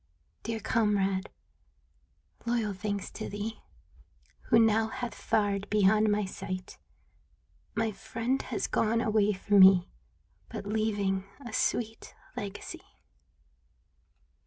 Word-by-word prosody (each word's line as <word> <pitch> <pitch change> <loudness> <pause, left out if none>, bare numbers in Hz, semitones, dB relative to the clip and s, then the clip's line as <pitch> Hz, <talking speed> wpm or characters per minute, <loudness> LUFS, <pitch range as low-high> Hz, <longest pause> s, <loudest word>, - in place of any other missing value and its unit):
Dear 225 0 -3
comrade, 200 -3 +1 1.2
loyal 230 -3 0
thanks 200 +1 -4
to 220 - -6
thee 210 +2 -5 0.9
Who 230 - +6
now 225 -1 +4
hath 240 0 -5
fared 205 -2 0
beyond 210 +1 +4
my 205 0 +1
sight, 185 -1 -6 1.0
My 225 -1 +1
friend 230 +6 -2
has 230 - -3
gone 225 +1 +1
away 215 -3 +3
from 200 +1 +2
me. 190 -2 +7 0.6
But - - -6
leaving 205 -3 0 0.2
a 240 - -7
sweet 225 -1 -1 0.2
legacy. 260 - -6
210 Hz, 105 wpm, -29 LUFS, 200-225 Hz, 1.2 s, me